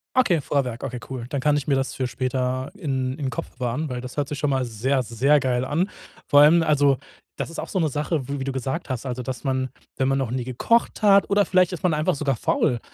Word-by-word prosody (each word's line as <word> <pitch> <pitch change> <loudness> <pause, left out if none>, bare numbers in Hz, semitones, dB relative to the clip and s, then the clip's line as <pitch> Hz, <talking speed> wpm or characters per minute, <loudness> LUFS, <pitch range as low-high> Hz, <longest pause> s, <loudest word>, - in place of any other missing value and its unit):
Okay, 180 - +3
Vorwerk, 125 -5 -1
okay, 125 - -4
cool. 125 -3 -5
Dann 140 -3 -2
kann 150 0 +3
ich 145 - -4
mir 140 - +3
das 135 0 -1
für 130 -1 -2
später 130 +2 -2
in 135 -7 -2
im 135 -2 -1
Kopf 115 - -5
bewahren, 125 +5 -2
weil 125 -1 -4
das 125 +3 -9
hört 145 -1 0
sich 145 -1 -5
schon 145 - +1
mal 130 -2 +1
sehr, 125 +4 0
sehr 135 +6 +3
geil 125 -1 0
an. 165 +9 0 0.4
Vor 145 0 +6
allem 165 +3 +6
also, 145 -3 +3 0.4
das - - -4
ist - - -7
auch - - -5
so 190 - -3
'ne 160 -2 +2
Sache, 150 -1 -2
w 140 0 -3
wie - - -2
du 135 - -2
gesagt 130 +5 -3
hast: 130 0 -3
„Also 125 0 -3
dass 130 +2 -5
man, 130 -1 -1 0.3
wenn 130 - +1
man 135 0 +2
noch 130 -4 -1
nie 125 -1 -1
gekocht 215 - +1
hat“, 200 -1 +5
oder 205 0 +3
vielleicht 185 -1 +3
ist 180 - -6
man 175 -3 +3
einfach 150 -1 +1
sogar 140 -3 0
faul. 120 +2 +1
135 Hz, 255 wpm, -24 LUFS, 130-150 Hz, 0.4 s, Vor